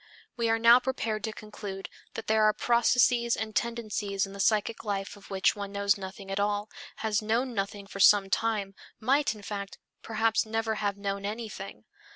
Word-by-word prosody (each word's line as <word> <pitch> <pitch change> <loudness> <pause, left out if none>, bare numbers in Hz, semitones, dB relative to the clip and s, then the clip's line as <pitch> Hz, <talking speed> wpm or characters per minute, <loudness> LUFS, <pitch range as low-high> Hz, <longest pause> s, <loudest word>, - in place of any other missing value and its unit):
We 235 -1 0
are 225 - +3
now 230 +2 +7
prepared 230 -4 -2
to 220 - -3
conclude 205 -2 -7 0.3
that 225 - -5
there 220 0 +3
are 215 - +5
processes 235 0 +3
and 220 -1 -4
tendencies 215 -4 -1
in 195 - -11
the 200 - -9
psychic 215 +2 +1
life 200 -2 -3
of 205 - -16
which 195 -1 +2
one 200 -1 -5
knows 200 0 +2
nothing 195 0 -8
at 195 - -1
all, 205 +1 -1 0.3
has 215 -1 +1
known 235 +4 0
nothing 200 -1 -3
for 195 0 -9
some 200 0 +6
time, 210 -4 0 0.3
might, 270 0 +2
in 210 - -13
fact, 200 -1 -5 0.2
perhaps 225 0 +1
never 225 0 -1
have 200 -1 -1
known 200 0 -3
anything. 210 -2 -6
210 Hz, 185 wpm, -29 LUFS, 200-225 Hz, 0.3 s, now